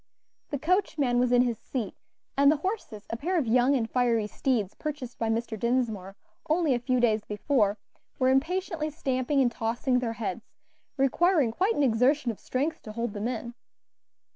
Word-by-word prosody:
The 285 Hz, -, -2 dB
coachman 310 Hz, -6 st, +1 dB
was 250 Hz, 0 st, +2 dB
in 245 Hz, 0 st, +5 dB
his 235 Hz, -3 st, -1 dB
seat, 245 Hz, -6 st, -4 dB, 0.4 s
and 280 Hz, +1 st, +6 dB
the 310 Hz, -, +1 dB
horses, 375 Hz, -, -4 dB
a -, -, -1 dB
pair 350 Hz, +9 st, -1 dB
of 305 Hz, -, +1 dB
young 250 Hz, +4 st, +3 dB
and 230 Hz, -4 st, 0 dB
fiery 235 Hz, -3 st, +1 dB
steeds 215 Hz, -3 st, -1 dB
purchased 285 Hz, -5 st, -6 dB
by 225 Hz, -, 0 dB
Mr. 225 Hz, -1 st, -2 dB
Dinsmore 225 Hz, -6 st, -1 dB, 0.3 s
only 315 Hz, -3 st, +3 dB
a 245 Hz, -, 0 dB
few 250 Hz, +1 st, 0 dB
days 220 Hz, -3 st, +2 dB
before, 210 Hz, -1 st, +1 dB, 0.4 s
were 255 Hz, -1 st, +3 dB
impatiently 310 Hz, +3 st, 0 dB
stamping 275 Hz, -2 st, 0 dB
and 245 Hz, -2 st, +3 dB
tossing 235 Hz, +3 st, 0 dB
their 235 Hz, -2 st, -2 dB
heads, 220 Hz, +3 st, -5 dB, 0.4 s
requiring 280 Hz, 0 st, +3 dB
quite 380 Hz, -, +1 dB
an 290 Hz, -, +2 dB
exertion 250 Hz, +2 st, +3 dB
of 215 Hz, -, -11 dB
strength 295 Hz, +5 st, -2 dB
to 215 Hz, -, -9 dB
hold 235 Hz, -1 st, -3 dB
them 210 Hz, +2 st, -2 dB
in. 235 Hz, -1 st, -4 dB
250 Hz, 175 wpm, -28 LUFS, 230-285 Hz, 0.4 s, and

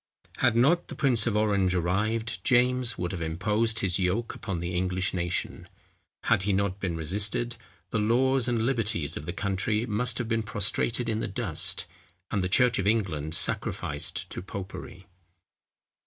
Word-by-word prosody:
Had 120 Hz, -, +2 dB
not 145 Hz, +9 st, +3 dB
the -, -, -8 dB
prince 120 Hz, -6 st, +4 dB
of 105 Hz, -2 st, +1 dB
Orange 100 Hz, -4 st, +2 dB
arrived, 105 Hz, +6 st, -1 dB
James 125 Hz, 0 st, +2 dB
would 90 Hz, -1 st, -2 dB
have 90 Hz, -3 st, -5 dB
imposed 105 Hz, +8 st, 0 dB
his 95 Hz, -1 st, +1 dB
yoke 95 Hz, +6 st, 0 dB
upon 95 Hz, -5 st, -4 dB
the 85 Hz, +1 st, -4 dB
English 90 Hz, +1 st, -1 dB
nation. 85 Hz, -2 st, -3 dB, 0.5 s
Had -, -, +3 dB
he 100 Hz, +1 st, 0 dB
not 100 Hz, 0 st, 0 dB
been 90 Hz, -4 st, -2 dB
resisted, 100 Hz, +8 st, +1 dB, 0.4 s
the 115 Hz, -, 0 dB
laws 125 Hz, +4 st, +2 dB
and 115 Hz, -2 st, +1 dB
liberties 105 Hz, -, 0 dB
of 75 Hz, -, -7 dB
the -, -, -1 dB
country 100 Hz, +4 st, -1 dB
must 115 Hz, +2 st, 0 dB
have 120 Hz, -, -2 dB
been 115 Hz, 0 st, 0 dB
prostrated 110 Hz, +3 st, 0 dB
in 110 Hz, -1 st, -1 dB
the -, -, -2 dB
dust, -, -, -1 dB, 0.5 s
and 100 Hz, -, 0 dB
the 90 Hz, -, -1 dB
church 125 Hz, +3 st, +4 dB
of 100 Hz, -, 0 dB
England 85 Hz, -8 st, 0 dB
sacrificed 85 Hz, +5 st, 0 dB
to -, -, -5 dB
popery. 95 Hz, -1 st, -8 dB
100 Hz, 165 wpm, -27 LUFS, 90-115 Hz, 0.5 s, prince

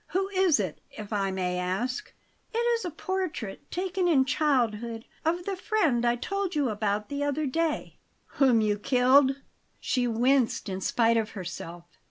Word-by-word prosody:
Who 385 Hz, +2 st, -1 dB
is 375 Hz, -, +3 dB
it, 185 Hz, -6 st, -3 dB
if 215 Hz, 0 st, -8 dB
I 195 Hz, -2 st, 0 dB
may 180 Hz, -1 st, -2 dB
ask?" 225 Hz, -, -2 dB, 0.4 s
"It 455 Hz, -, -3 dB
is 470 Hz, -1 st, +1 dB
a 360 Hz, -, -2 dB
portrait, 330 Hz, -, -4 dB
taken 365 Hz, 0 st, -1 dB
in 275 Hz, -6 st, +4 dB
childhood, 235 Hz, -6 st, 0 dB, 0.2 s
of 345 Hz, +2 st, 0 dB
the 395 Hz, -, -2 dB
friend 360 Hz, -, +1 dB
I 240 Hz, 0 st, +3 dB
told 390 Hz, +8 st, -3 dB
you 285 Hz, -4 st, +1 dB
about 210 Hz, 0 st, -1 dB
the 285 Hz, 0 st, -2 dB
other 290 Hz, +1 st, 0 dB
day 315 Hz, +3 st, -2 dB
" -, -, -43 dB, 0.2 s
"Whom 250 Hz, -5 st, +5 dB
you 210 Hz, -1 st, +1 dB
killed?" 260 Hz, +3 st, +4 dB, 0.4 s
She 250 Hz, -1 st, 0 dB
winced 240 Hz, -1 st, +2 dB
in 190 Hz, 0 st, -4 dB
spite 230 Hz, +3 st, +2 dB
of 225 Hz, -1 st, -1 dB
herself. 175 Hz, -1 st, -7 dB
255 Hz, 170 wpm, -27 LUFS, 215-335 Hz, 0.4 s, Whom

